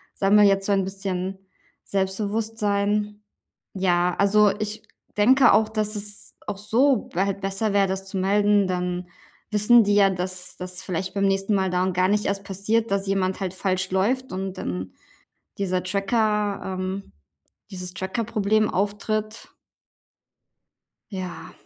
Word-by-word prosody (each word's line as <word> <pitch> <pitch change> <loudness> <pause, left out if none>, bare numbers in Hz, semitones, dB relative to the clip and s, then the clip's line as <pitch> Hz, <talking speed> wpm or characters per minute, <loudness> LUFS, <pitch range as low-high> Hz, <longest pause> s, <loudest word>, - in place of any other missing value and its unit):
sammle 205 +2 +4
jetzt 195 -1 +3
so 205 - +1
ein 195 - +2
bisschen 190 -1 -4 0.5
Selbstbewusstsein. 205 +1 -1 0.5
Ja, 180 -2 +2
also 205 +1 +5
ich 215 0 -4 0.3
denke 255 +6 +6
auch, 215 0 +4
dass 215 -1 -2
es 205 0 -9
auch 205 -2 -4
so 235 +4 +2
halt 195 +2 0
besser 195 +2 -1
wäre, 200 -1 +3
das 190 0 -3
zu 195 - -7
melden. 205 +1 +3
Dann 180 0 -2 0.4
wissen 220 +2 +5
die 205 0 +2
ja, 200 -1 +5
dass 180 0 -5
das 180 0 -7
vielleicht 185 0 -4
beim 200 -1 0
nächsten 195 +2 +1
Mal 190 -1 +1
darum 180 +1 +1
gar 185 +1 +2
nicht 210 +1 +1
erst 200 0 -2
passiert, 210 +3 -1
dass 200 0 0
jemand 190 -1 0
halt 190 -2 -3
falsch 185 0 -1
läuft 240 +8 0
und 190 0 -4
dann 90 +1 -4 0.7
dieser 185 -2 0
Tracker, 205 +1 0 0.2
ähm, 190 +1 -4 0.6
dieses 180 -1 -7
Trackerproblem 215 +1 0
auftritt. 210 +2 -3 1.6
Ja, 185 -3 -6
195 Hz, 140 wpm, -24 LUFS, 190-210 Hz, 1.6 s, denke